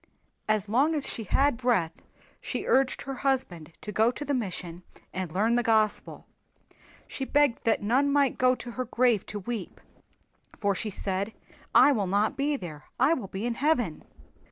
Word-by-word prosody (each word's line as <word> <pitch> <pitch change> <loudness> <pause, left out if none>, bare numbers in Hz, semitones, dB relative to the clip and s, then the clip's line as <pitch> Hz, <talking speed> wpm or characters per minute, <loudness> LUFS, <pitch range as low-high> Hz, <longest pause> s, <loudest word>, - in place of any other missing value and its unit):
As 215 -1 +1
long 275 +9 +2
as 290 - -2
she 225 - -5
had 275 +5 +2
breath 230 -10 +1 0.5
she - - -4
urged 265 0 +2
her 270 - -5
husband 185 - -1
to 210 - -6
go 220 +3 +3
to 290 +4 -5
the 285 - -1
mission 180 -7 -4 0.3
and 185 -3 -4
learn 215 +7 +1
the 240 - +3
Gospel. 220 -3 0 0.8
She 270 - -5
begged 285 -2 +2
that 225 -2 +2
none 265 +7 +2
might 280 -2 +2
go 255 0 +4
to 245 - -8
her 255 +2 -3
grave 240 -3 +1
to 210 - -5
weep, 210 -1 -5 0.8
for 200 -1 +1
she 215 +3 -3
said, 195 +2 -2 0.4
"I 290 - +8
will 210 -8 0
not 205 +8 +1
be 285 +2 0
there. 155 - -8
I 270 +6 +5
will 250 -11 -3
be 195 +3 -5
in 240 - 0
Heaven." 245 - 0
230 Hz, 180 wpm, -27 LUFS, 200-265 Hz, 0.8 s, I